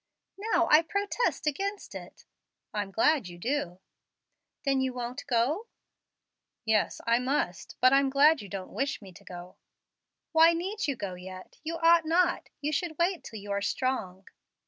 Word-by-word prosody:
"Now 340 -1 +3
I 305 - +8
protest 400 +6 -1
against 395 +8 -2
it." - - -10 0.5
"I'm 205 -2 -2
glad 235 - +2
you 175 -1 -10
do." 205 -4 -2 0.9
"Then 270 -1 +2
you 260 -1 -1
won't 245 +1 -5
go?" 280 - +1 1.0
"Yes, 220 -1 +1
I 235 +1 +3
must; 250 - -2
but 255 +1 +6
I'm 275 0 +4
glad 290 +2 +5
you 200 - -10
don't 190 -1 -6
wish 275 +1 -1
me 195 -3 -12
to - - -15
go" 180 0 -10 0.7
"Why 330 +1 +6
need 380 +5 -2
you 280 - 0
go 200 -5 -5
yet? 185 +1 -10
You 330 +1 -3
ought 330 0 +5
not. 345 +2 +2
You 295 +1 -1
should 315 +1 -2
wait 345 +1 +1
till 220 - -8
you 205 0 -7
are 200 0 0
strong." 200 -5 -2
270 Hz, 165 wpm, -29 LUFS, 205-325 Hz, 1.0 s, I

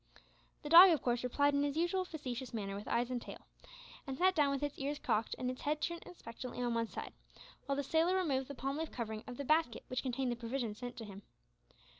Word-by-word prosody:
The 295 - -5
dog 350 +4 +11
of 320 -5 +2
course 240 -1 0
replied 285 +3 +2
in 280 0 +2
its 290 +1 -1
usual 350 +3 +1
facetious 260 -7 -5
manner 200 -3 -3
with 205 +1 -7
eyes 240 +1 0
and 245 -1 -2
tail, - - -8 0.7
and 265 -1 -4
sat 375 +1 +4
down 295 -5 +3
with 275 0 -1
its 290 -1 -3
ears 285 +2 -2
cocked 220 -5 0
and 255 0 -1
its 255 - -9
head 300 +1 0
turned 340 +2 -3
expectantly 245 -6 -8
on 240 -1 0
one 230 0 0
side, - - -7 0.5
while 280 - +1
the 285 - -1
sailor 325 +6 +2
removed 275 -8 0
the 280 - -7
palm 270 +4 -3
leaf 320 -1 -3
covering 220 -3 -4
of 245 - -7
the 280 - -4
basket 310 -5 +2
which 255 - -1
contained 255 -1 -1
the - - -1
provisions 235 -2 -4
sent 245 -1 -6
to 225 - -6
him. 200 -1 -10
270 Hz, 235 wpm, -35 LUFS, 240-300 Hz, 0.7 s, dog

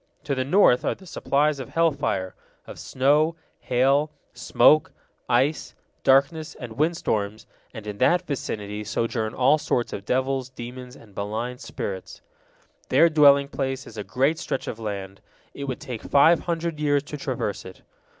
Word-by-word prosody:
To 140 - -2
the 130 -1 0
north 140 -3 +4
are - - 0
the 190 - -17
supplies 150 -3 0
of 130 - -7
hell 165 0 +2
fire, 95 -10 -2 0.3
of - - -10
snow, 150 +5 +2 0.2
hail, 135 +4 +2 0.2
smoke, 155 0 +4 0.4
ice, 130 +5 +1 0.3
darkness, 140 +4 +2
and 120 -3 -8
windstorms, 110 -8 -1 0.3
and 110 -3 -9
in 105 -1 -6
that 175 +1 +3
vicinity 105 - -4
sojourn 110 +1 -2
all 135 +4 +4
sorts 120 -5 -1
of 100 - -5
devils, 130 +2 -1
demons, 125 0 -9
and 105 -7 -17
malign 115 +5 -4
spirits. 95 -2 -6 0.7
Their 170 - +5
dwelling 140 -2 +6
place 135 -1 -3
is 115 - -12
a 105 - -5
great 135 - 0
stretch 135 - -3
of 115 - -5
land, 100 -3 -6 0.3
it 140 - -6
would 130 -2 -4
take 125 -7 -7
five 160 +4 +4
hundred 170 -2 -3
years 145 -2 +1
to 150 - -8
traverse 130 -7 -3
it. 95 - -12
130 Hz, 160 wpm, -24 LUFS, 110-150 Hz, 0.7 s, dwelling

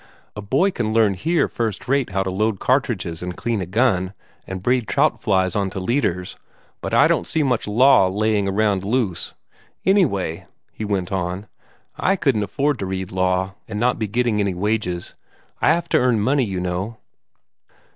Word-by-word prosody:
A 105 - -5
boy 135 - +2
can 110 -9 -2
learn 110 -3 +4
here 165 - +1
first 115 -1 -3
rate 135 0 +1
how 95 0 0
to 95 - -3
load 105 +1 0
cartridges 110 - 0
and 90 0 -5
clean 115 -4 -1
a 90 - -4
gun, 95 -3 +1 0.3
and 95 -1 -6
braid 125 -1 +1
trout - - +1
flies 95 -2 +1
on 100 -2 0
to 95 - -5
leaders, 95 -4 -1 0.4
but - - -4
I - - +5
don't 85 - +1
see 160 - +1
much 125 -6 0
law 115 -2 +5
laying 105 +1 +1
around 100 -1 +1
loose. 105 -4 -1 0.5
Anyway," 125 - +1 0.3
he - - -6
went 95 -4 -2
on, 95 +1 -2 0.5
"I 195 - +2
couldn't 135 - +1
afford 135 +7 0
to 95 - -3
read 95 -1 -4
law, 95 +1 0
and 105 -2 -4
not 125 +1 +1
be 110 - -1
getting 120 0 0
any 100 -3 0
wages. 95 -3 -2 0.5
I - - +3
have 170 +1 0
to - - +4
earn 125 -3 +2
money, 130 +5 +2
you 95 -3 -3
know." 90 +5 -3
105 Hz, 180 wpm, -21 LUFS, 95-125 Hz, 0.5 s, I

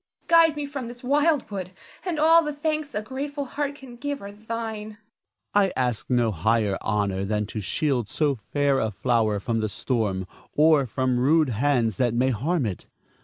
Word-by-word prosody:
Guide 330 -2 +6
me 295 -1 -3
from 280 -4 -5
this 240 +1 -10
wild 290 +3 +2
wood, 185 -2 -5 0.3
and 350 -3 -2
all 325 +2 +6
the 300 - -2
thanks 305 0 -2
a 210 - -1
grateful 280 +4 -4
heart 285 +2 -3
can 260 -4 -12
give 285 +2 -3
are 200 0 -8
thine. 220 0 -5
Ernest. 215 0 -10 0.6
I 200 -2 +3
ask 125 -3 -1
no 120 -3 +2
higher 105 +3 +1
honor 100 -3 0
than 105 +1 -1
to 110 +1 -5
shield 125 +1 -1
so 150 -2 +1 0.2
fair 145 -2 +2
a 110 - 0
flower 110 -1 +1
from 115 +2 -1
the 110 -1 -1
storm, 105 -5 -1 0.3
or 150 -3 +5
from 125 +2 0
rude 150 +3 +4
hands 120 -3 +1
that 120 -2 +1
may 130 +2 +2
harm 135 - 0
it. 100 -5 -5
150 Hz, 185 wpm, -25 LUFS, -, 0.6 s, Guide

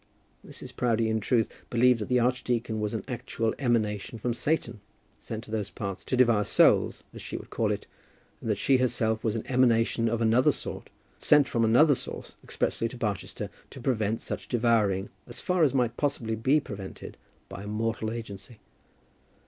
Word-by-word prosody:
Mrs. - - -10
Proudie 115 -2 +1
in 110 - +1
truth 115 +1 +2 0.2
believed 125 0 +4
that 105 - -5
the 125 0 +3
archdeacon 120 -2 0
was 105 +1 -2
an 105 - -3
actual 115 -3 -2
emanation 115 -4 0
from 120 +2 -1
Satan, 120 -4 -1 0.4
sent 110 0 -6
to 110 - -13
those 105 -3 -2
parts 100 0 -5
to 130 - -1
devour 120 -4 +4
souls, - - +3
as - - -9
she - - -5
would - - -11
call - - 0
it, - - -3 0.6
and - - -4
that - - +1
she 135 - +3
herself 110 -3 0
was 110 -1 0
an 115 - -3
emanation 115 -2 +2
of 115 0 -1
another 115 +2 +4
sort, - - -7 0.3
sent 150 -2 +5
from 115 -4 0
another 125 +7 +6
source - - -6
expressly 115 - -1
to 125 - -10
Barchester, 105 -6 -3 0.2
to - - -11
prevent 115 -4 0
such - - -6
devouring, 110 -5 +2 0.2
as 120 - -7
far 180 -1 0
as 155 - +6
it 135 - -1
might 120 -2 0
possibly 130 -6 -1
be 130 +7 +3
prevented 100 -8 -8 0.3
by 100 - -8
a 100 - -8
mortal 110 +1 -2
agency. 110 0 -8
115 Hz, 180 wpm, -28 LUFS, 110-125 Hz, 0.6 s, another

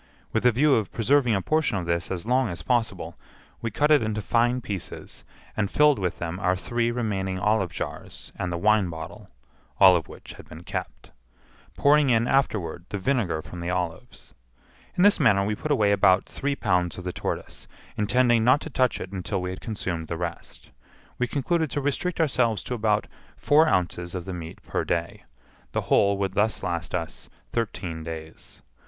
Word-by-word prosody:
With 115 +2 +3
a - - +6
view 140 +5 +3
of 110 -5 +1
preserving 125 0 +3
a 95 - -1
portion 155 -9 +1
of 90 - -3
this 85 0 -1
as 95 0 -4
long 125 0 +2
as 85 - -6
possible, 120 -3 -1 0.4
we 115 - -2
cut 150 +5 +1
it 150 - +6
into 110 -1 -1
fine 120 +3 +2
pieces, 100 -6 -6 0.3
and 105 -2 0
filled 150 -5 +4
with 90 -2 -2
them 85 +2 -4
our 90 -1 +2
three 120 +5 -1
remaining 100 -6 -2
olive 95 -1 +1
jars - - -6
and 90 - -3
the 85 - -2
wine 105 0 +3
bottle 80 -1 -8 0.5
(all 95 -2 +8
of 80 -6 -1
which - - -11
had - - -14
been 80 +2 -10
kept), - - -6 0.7
pouring 145 -1 +4
in 115 0 +3
afterward 100 -11 0
the 105 - -3
vinegar 95 - 0
from 90 - -9
the 85 +1 -3
olives. 90 -2 -4 0.6
In 180 - +3
this 205 0 +5
manner 100 -2 +4
we 105 - 0
put 155 - -5
away 110 -8 +3
about 95 -2 +4
three 140 0 -3
pounds 90 - 0
of 90 - -7
the 90 0 -4
tortoise, - - -5 0.3
intending 120 +2 +3
not 130 +5 +5
to 160 - -7
touch 130 -1 +1
it 90 - -7
until 95 +1 -3
we 90 0 -3
had 95 - -8
consumed 95 -7 -4
the 85 - -4
rest. 85 0 -7 0.5
We 125 - +1
concluded 160 +4 0
to 145 - -2
restrict 145 +6 -1
ourselves 125 -8 +1
to - - -4
about 110 -2 +1 0.3
four 155 +2 +4
ounces 90 - 0
of 90 -2 -4
the 95 - -5
meat 85 -2 -8
per - - -2
day; 85 0 -3 0.5
the - - 0
whole 100 0 +3
would 95 -1 -1
thus 110 +2 0
last 85 0 -2
us 85 -2 -5 0.2
thirteen 90 -8 -3
days. 80 -1 -9
105 Hz, 190 wpm, -25 LUFS, 90-125 Hz, 0.7 s, all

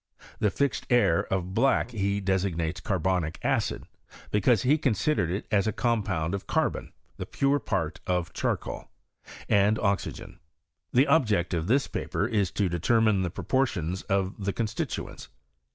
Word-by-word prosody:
The 105 - +3
fixed 125 +2 -1
air 120 -9 +3
of 95 -2 +1
filack 125 +2 +2
he 100 -2 -1
deaig 95 -2 0
Mii:e9 80 +1 -3
carhomic 90 -4 -1
acidy - - 0 0.5
because 105 +1 +3
he 145 +5 +3
considered 135 - +1
it 95 +5 -3
as 105 0 +2
a 110 - 0
eonpound 100 -9 0
of 100 - -4
carbom - - -1 0.3
(the - - -5
pore 140 +1 +1
part 85 - -2
of 90 -2 -1
charcoal) - - -3 0.6
and 105 +1 +3
MT^rtu. 100 -4 -2 0.5
The 130 +3 +4
object 105 - +2
of 85 -1 -1
this 135 +5 +3
paper - - -2
is 100 -4 +1
to 100 - 0
determint 100 +4 +2
the 90 - -1
piv>|Miition 95 -5 -1
of 95 +1 -1
the 100 0 -1
constituents. 110 +2 -4
100 Hz, 150 wpm, -27 LUFS, 90-115 Hz, 0.6 s, The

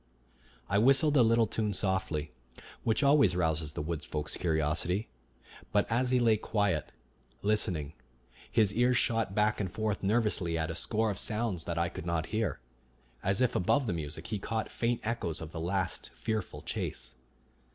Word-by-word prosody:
I 100 0 +2
whistled 135 +5 +4
a 135 - +6
little 115 0 +4
tune 105 -2 -1
softly, 95 -6 -1 0.5
which 115 +5 +2
always 140 -10 +5
rouses 80 -3 0
the - - -3
wood 80 -1 -3
folk's 75 -1 -4
curiosity; 85 +5 0 0.6
but 105 - +3
as 125 +2 +2
he 125 0 +3
lay 115 -3 +4
quiet, 105 -7 0 0.5
listening, 90 -8 0 0.6
his 105 -3 +3
ears 125 +2 +3
shot 115 -5 +1
back 105 0 +2
and 95 -4 -2
forth 110 0 -2
nervously 100 -5 +1
at 80 0 -1
a - - -5
score 110 +4 0
of 95 - -2
sounds 105 -6 -1
that 85 -1 -3
I 85 0 +2
could 85 0 -7
not 85 -1 0
hear, 110 -8 0 0.6
as 95 +4 +1
if 125 -1 +2
above 130 +10 +2
the 105 - -1
music 80 0 -4
he 105 +1 -3
caught 110 +2 -3
faint 120 0 -1
echoes 105 -8 -2
of 80 -1 -7
the 80 - -5
last 90 +2 -2
fearful 110 -4 -3
chase. - - -4
100 Hz, 170 wpm, -31 LUFS, 85-115 Hz, 0.6 s, a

